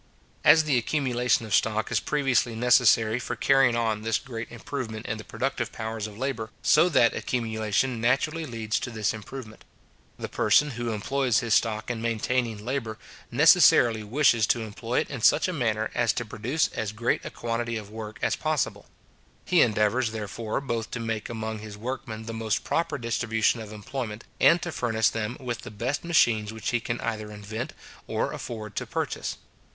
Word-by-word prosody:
As 160 - +7
the 140 -5 +2
accumulation 125 -3 +1
of 105 - -5
stock 110 0 +1
is - - +2
previously 135 -5 +1
necessary 115 -1 +4
for - - -4
carrying 135 -3 +4
on 110 -2 0
this 115 0 +1
great 115 -3 -7
improvement 115 -2 -5
in 110 -2 -3
the - - -7
productive 125 -2 -3
powers 110 -1 -4
of 105 -1 -11
labour, 120 -4 -3
so 160 +4 +5
that 120 -8 +4
accumulation 115 0 -1
naturally 150 +6 +1
leads 115 -3 -2
to - - -4
this 110 -4 -1
improvement. 110 +1 -9 0.5
The - - -5
person 150 0 +3
who 120 -1 -3
employs 120 +2 +1
his 115 -2 0
stock 110 +1 +1
in 115 -2 -4
maintaining 115 -1 -1
labour, 120 -4 -3 0.3
necessarily 115 -2 +6
wishes 115 0 +3
to 120 - +2
employ 115 +2 -2
it - - -6
in 135 -4 -5
such - - +5
a 185 - -2
manner 110 -7 -1
as 120 -3 +2
to 120 - -3
produce 120 +9 -1
as 110 -1 -4
great 115 +2 0
a - - -5
quantity 115 0 -3
of 105 -1 -8
work 110 0 -7
as - - +2
possible. 155 -3 -1 0.6
He 180 -3 +4
endeavours, 110 +1 +2
therefore, 110 +3 -3
both 115 -5 -3
to - - -5
make 115 -2 -3
among 110 -1 -4
his 105 -1 -9
workmen 110 -1 -5
the 115 - -5
most 110 -1 -1
proper 165 -3 -1
distribution 115 -1 0
of 110 -2 -8
employment, 110 +1 -5 0.2
and 170 - +6
to 175 - -3
furnish 110 -6 +1
them 115 +2 -3
with 125 -3 -4
the - - -8
best 120 +7 -3
machines 115 -11 +3
which 110 -1 -3
he 120 - +1
can 115 +1 -3
either 110 -2 -3
invent 105 +3 -6 0.3
or - - -1
afford 110 -3 -7
to - - -2
purchase. - - -3
115 Hz, 180 wpm, -26 LUFS, 110-125 Hz, 0.6 s, As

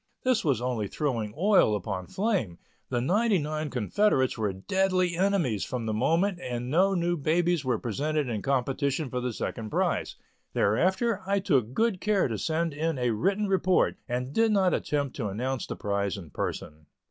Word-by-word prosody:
This 255 -3 +2
was 130 -6 +1
only 120 -5 -1
throwing 115 -5 -2
oil 190 - +4
upon 95 -2 -4
flame; 185 - -1 0.3
the 125 - 0
ninety 205 - +2
nine 155 -1 -3
confederates 130 - +1
were 105 -3 -1
deadly 185 - 0
enemies 175 - +1
from 125 -3 -4
the 110 - -1
moment 170 - +1
and 125 -2 -4
no 190 +5 +3
new 175 0 +1
babies 170 +1 +1
were 125 -3 +1
presented 145 +6 -1
in 110 -4 -2
competition 135 +2 -1
for 125 - -2
the 125 0 -2
second 110 0 -4
prize. - - 0 0.4
Thereafter, 190 - +1
I 200 0 +2
took 135 - +1
good 220 -5 +1
care 210 -2 +2
to 110 -4 -3
send 165 0 -1
in 160 +1 -1
a 125 -1 +1
written 195 - 0
report 185 -1 +2
and 125 +2 -2
did 225 +3 +3
not 190 -3 +3
attempt 140 -3 -1
to 115 -6 -2
announce 125 +6 -3
the - - -4
prize 100 -1 -1
in 85 -7 -10
person. 75 +3 -5
145 Hz, 175 wpm, -27 LUFS, 115-185 Hz, 0.4 s, oil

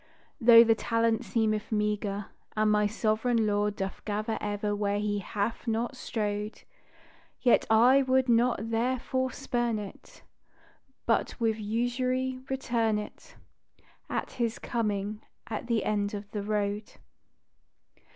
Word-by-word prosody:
Though 230 -2 +9
the 230 -1 +4
talent 230 0 0
seemeth 215 -1 0
meager, 210 -1 -1 0.3
And 215 0 +3
my 210 0 +3
Sovereign 220 +2 +1
Lord 205 0 +1
doth 195 -1 -5
gather, 215 +1 -2
ever, 205 0 -1
where 205 0 0
He 205 0 -1
hath 210 +5 -3
not 230 +3 -1
strowed, 210 -3 -3 0.8
Yet 245 - +3
I 245 +5 +6
would 260 -1 +2
not 235 -1 +2
therefore 255 +2 0
spurn 240 -4 -1
it, 205 -2 -10 0.8
But 230 - 0
"with 225 -2 +1
usury" 255 +4 -1
return 235 -5 0
it, 210 - -8 0.7
At - - -3
His 235 -2 -2
coming 210 -2 -2 0.2
at 225 - -5
the 230 -3 +1
end 205 -1 0
of 205 0 -8
the 210 - -3
road. 205 0 -2
220 Hz, 125 wpm, -29 LUFS, 210-235 Hz, 0.8 s, Though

